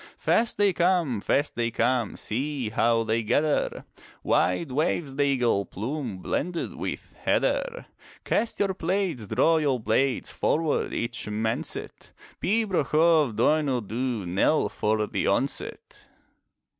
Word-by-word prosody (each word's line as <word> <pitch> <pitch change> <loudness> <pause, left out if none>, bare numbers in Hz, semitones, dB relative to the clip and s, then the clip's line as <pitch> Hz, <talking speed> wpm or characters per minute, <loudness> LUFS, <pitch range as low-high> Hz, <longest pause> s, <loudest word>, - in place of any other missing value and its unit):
Fast 230 0 +1
they 200 -2 +3
come, 170 - +1
fast 145 +7 +1
they 115 -1 -1
come; 120 -1 0
See 130 +1 -2
how 115 +1 +2
they 115 +1 0
gather! 145 +7 0 0.4
Wide 110 - +1
waves 145 0 -1
the 145 - 0
eagle 125 -7 +2
plume. 120 +1 -5
Blended 170 +2 -2
with - - -6
heather. - - 0 0.4
Cast 230 - 0
your 195 -2 +1
plaids, 175 - -2
draw 165 +10 +3
your 140 -5 +1
blades, 125 +4 0
Forward 160 -1 0
each 115 -2 -3
man 110 +2 -1
set! - - -5 0.3
Pibroch 195 -8 0
of 155 -7 +4
Donuil 145 -4 +2
Dhu, 120 -3 -2
Knell 95 - +2
for 105 0 0
the - - -2
onset! - - -2
135 Hz, 130 wpm, -26 LUFS, 115-165 Hz, 0.4 s, of